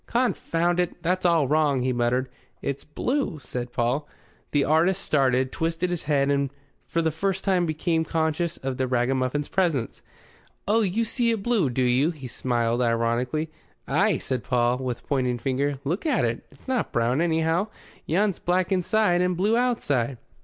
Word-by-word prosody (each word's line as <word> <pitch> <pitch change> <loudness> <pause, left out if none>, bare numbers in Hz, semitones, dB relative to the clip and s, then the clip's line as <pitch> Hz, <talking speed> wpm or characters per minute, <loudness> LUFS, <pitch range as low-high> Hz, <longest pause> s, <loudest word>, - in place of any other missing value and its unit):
"Confound 175 -8 +1
it! 180 0 -2
that's 180 +1 +1
all 165 -5 +3
wrong," 145 -2 +2
he 130 0 0
muttered. 120 +2 +1 0.3
"It's 140 0 -3
blue," 245 - -2
said 125 -2 -6
Paul. 125 +5 -1 0.4
The 145 -1 +2
artist 170 +6 +2
started, 130 -2 +2
twisted 165 +2 -1
his 175 - -2
head, 140 -1 +3
and 140 -1 +1 0.4
for 165 - 0
the 160 - +1
first 190 +4 -2
time 185 -3 +2
became 160 +1 0
conscious 160 +1 -1
of 130 -1 -4
the 130 - 0
ragamuffin's 130 +3 0
presence. 165 -11 0 0.7
"Oh, 220 +3 +3
you 215 +3 +1
see 235 +1 0
it 225 -4 0
blue, 220 - +2
do 125 +1 0
you?" 125 +5 +3
He 150 -6 -7
smiled 120 -1 0
ironically. 120 +6 0 0.4
"Ay," - - +2
said 130 -3 -3
Paul, 125 0 +1
with 125 -2 -4
pointing 125 -3 0
finger. 135 +3 -1
"Look 170 - -2
at 265 - +2
it. 115 0 -3
It's 135 - -21
not 260 -3 -1
brown, 120 +5 +1
anyhow. 165 +3 +1 0.4
Yon's 195 +4 +1
black 180 +1 0
inside 185 0 +2
and 180 -1 +1
blue 205 +5 +2
outside." 145 - 0
155 Hz, 165 wpm, -25 LUFS, 130-180 Hz, 0.7 s, all